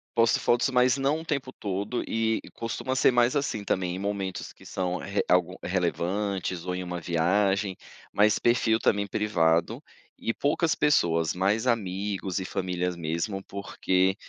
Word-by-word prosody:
posto 115 Hz, -1 st, +4 dB
fotos, 120 Hz, +2 st, +2 dB
mas 125 Hz, 0 st, +3 dB
não 140 Hz, +4 st, +1 dB
o -, -, -12 dB
tempo 140 Hz, -5 st, -2 dB
todo 100 Hz, +3 st, -3 dB
e 110 Hz, 0 st, 0 dB
costuma 115 Hz, +3 st, -3 dB
ser 130 Hz, -, +5 dB
mais, 120 Hz, 0 st, +3 dB
assim, 140 Hz, -8 st, -1 dB
também 90 Hz, -2 st, -1 dB
em -, -, -4 dB
momentos 100 Hz, -1 st, -3 dB
que -, -, -18 dB
são 90 Hz, -1 st, -2 dB
re 100 Hz, +1 st, -2 dB
algu 90 Hz, -2 st, +2 dB
relevantes 90 Hz, 0 st, -1 dB
ou 90 Hz, -, -1 dB
em 90 Hz, 0 st, -4 dB
uma 90 Hz, -1 st, -4 dB
viagem. 95 Hz, +4 st, +1 dB, 0.3 s
Mas 105 Hz, +1 st, +4 dB
perfil 120 Hz, -2 st, +3 dB
também 100 Hz, -2 st, +1 dB
privado, 85 Hz, -6 st, +1 dB, 0.4 s
e 115 Hz, -, -2 dB
poucas 155 Hz, +3 st, +1 dB
pessoas, 85 Hz, -, +2 dB
mais 100 Hz, +6 st, +1 dB
amigos 100 Hz, -4 st, -1 dB
e 95 Hz, -, -3 dB
famílias 90 Hz, -1 st, -2 dB
mesmo, 85 Hz, +4 st, -3 dB
porque 95 Hz, -1 st, 0 dB
100 Hz, 155 wpm, -27 LUFS, 90-115 Hz, 0.4 s, ser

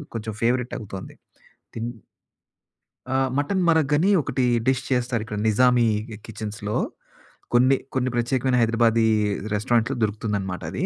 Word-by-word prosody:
కొంచెం 110 Hz, -1 st, -4 dB
ఫేవరెట్ 125 Hz, +1 st, +1 dB
అవుతుంది. 95 Hz, -3 st, -8 dB, 0.6 s
తిన్ 115 Hz, +1 st, -3 dB, 1.2 s
ఆ! -, -, +1 dB, 0.2 s
మటన్ 185 Hz, +7 st, 0 dB
మరగ్ 160 Hz, -3 st, +3 dB
అని 180 Hz, +6 st, +2 dB
ఒకటి 130 Hz, -2 st, -1 dB, 0.2 s
డిష్ 130 Hz, 0 st, +2 dB
చేస్తారు. 125 Hz, -3 st, 0 dB
ఇక్కడ 105 Hz, -1 st, -5 dB
నిజామీ 125 Hz, +2 st, +4 dB, 0.2 s
కి 110 Hz, -, -8 dB
కిచెన్స్‌లో. 105 Hz, -1 st, -4 dB, 0.8 s
కొన్ని, 130 Hz, +2 st, +5 dB, 0.2 s
కొన్ని 130 Hz, -1 st, +1 dB
ప్రత్యేకమైన 125 Hz, +1 st, +1 dB
హైదరాబాదీ 115 Hz, 0 st, +3 dB, 0.5 s
రెస్టారెంట్‌లో 115 Hz, +4 st, +1 dB
దొరుకుతుందనమాట 100 Hz, -3 st, -2 dB
అది. -, -, -2 dB
120 Hz, 120 wpm, -24 LUFS, 110-130 Hz, 1.2 s, కొన్ని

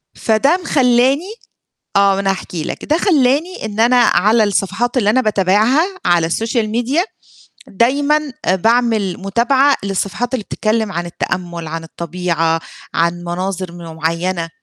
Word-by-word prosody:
فده 235 Hz, +10 st, +2 dB
مخلّاني 270 Hz, -, +2 dB, 0.6 s
آه 200 Hz, 0 st, +5 dB
مأنا 195 Hz, 0 st, 0 dB
هاحكي 180 Hz, -4 st, -4 dB
لك، -, -, -5 dB
ده 310 Hz, +2 st, +1 dB
خلّاني 310 Hz, -, +1 dB
إن 215 Hz, 0 st, -3 dB
أنا 240 Hz, +2 st, +4 dB
على 215 Hz, +1 st, +4 dB
الصفحات 210 Hz, +5 st, -1 dB
اللي 210 Hz, -5 st, +3 dB
أنا 260 Hz, -, +3 dB
باتابعها 215 Hz, -, +2 dB, 0.2 s
على 175 Hz, -2 st, +3 dB
السوشيال 225 Hz, +5 st, -1 dB
ميديا 245 Hz, +9 st, 0 dB, 0.6 s
دايمًا 285 Hz, +7 st, +1 dB, 0.2 s
باعمل 220 Hz, 0 st, +1 dB
متابعة 240 Hz, +8 st, +2 dB
للصفحات 200 Hz, +5 st, -2 dB
اللي 230 Hz, -5 st, -2 dB
بتتكلم 215 Hz, -1 st, -1 dB
عن 175 Hz, 0 st, -3 dB
التأمُّل 170 Hz, -1 st, -4 dB
عن 165 Hz, +1 st, -5 dB
الطبيعة، 165 Hz, -1 st, -2 dB, 0.3 s
عن 170 Hz, +1 st, +2 dB
مناظر 180 Hz, +1 st, -4 dB, 0.2 s
معيّنة 165 Hz, +2 st, -2 dB
215 Hz, 125 wpm, -17 LUFS, 180-250 Hz, 0.6 s, آه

